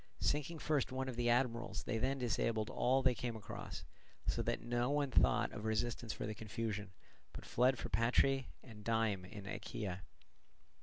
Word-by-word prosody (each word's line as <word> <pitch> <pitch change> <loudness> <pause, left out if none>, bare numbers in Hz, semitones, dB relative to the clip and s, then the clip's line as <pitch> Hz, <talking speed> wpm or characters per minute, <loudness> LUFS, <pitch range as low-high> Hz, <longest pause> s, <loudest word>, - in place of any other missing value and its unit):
Sinking 150 +3 0
first 150 -4 +1
one 130 0 -2
of 130 - -3
the 120 0 +1
admirals, 120 -4 +1
they 115 - -1
then 135 +3 +1
disabled 115 -3 0
all 130 +2 +3
they 130 -1 +5
came 120 -2 -3
across, 110 - -6 0.4
so - - +1
that - - 0
no 120 +2 0
one 145 -1 +1
thought - - +4
of 105 - -6
resistance 110 +1 -1
for - - -4
the 105 - -2
confusion, 105 -1 -3 0.4
but - - -8
fled 125 +2 +3
for - - -4
Patrae 125 +5 +3 0.2
and 110 -4 -11
Dyme 110 -4 +1
in 100 +1 -9
Achaea. 95 -2 -4
120 Hz, 170 wpm, -37 LUFS, 110-130 Hz, 0.4 s, they